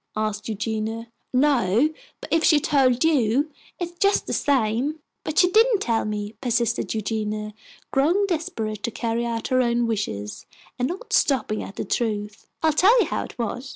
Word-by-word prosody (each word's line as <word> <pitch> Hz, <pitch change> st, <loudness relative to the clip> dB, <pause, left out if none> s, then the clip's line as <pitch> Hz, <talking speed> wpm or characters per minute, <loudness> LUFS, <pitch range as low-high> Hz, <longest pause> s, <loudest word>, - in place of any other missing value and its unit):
asked 215 Hz, 0 st, -2 dB
Eugenia. 220 Hz, +2 st, -3 dB, 0.2 s
"No, 255 Hz, -1 st, +3 dB, 0.3 s
but -, -, -5 dB
if 330 Hz, 0 st, +3 dB
she 305 Hz, -3 st, +5 dB
told 265 Hz, -3 st, +2 dB
you, 285 Hz, -1 st, +2 dB, 0.3 s
it 350 Hz, -1 st, -2 dB
is 345 Hz, -, -21 dB
just 400 Hz, 0 st, +3 dB
the -, -, -3 dB
same." 265 Hz, +2 st, +1 dB, 0.3 s
"But 310 Hz, -, -4 dB
she 360 Hz, 0 st, +5 dB
didn't 450 Hz, +2 st, +5 dB
tell 230 Hz, -7 st, 0 dB
me," 210 Hz, 0 st, -4 dB
persisted 235 Hz, -2 st, 0 dB
Eugenia, 215 Hz, 0 st, -3 dB, 0.4 s
grown 335 Hz, +9 st, +3 dB
desperate 225 Hz, -, -3 dB
to 235 Hz, -, -1 dB
carry 235 Hz, +1 st, -2 dB
out 230 Hz, -1 st, -3 dB
her 255 Hz, 0 st, +3 dB
own 240 Hz, -1 st, +1 dB
wishes, 195 Hz, -, -3 dB, 0.3 s
and 250 Hz, -, +1 dB
not 370 Hz, -, -6 dB
stopping 220 Hz, -6 st, +2 dB
at 195 Hz, -, -8 dB
the -, -, -4 dB
truth. 210 Hz, -1 st, -2 dB, 0.2 s
"I'll 315 Hz, -1 st, +4 dB
tell 410 Hz, +10 st, +5 dB
you -, -, +4 dB
how -, -, -2 dB
it -, -, -13 dB
was." 245 Hz, +3 st, -4 dB
235 Hz, 175 wpm, -24 LUFS, 215-300 Hz, 0.4 s, she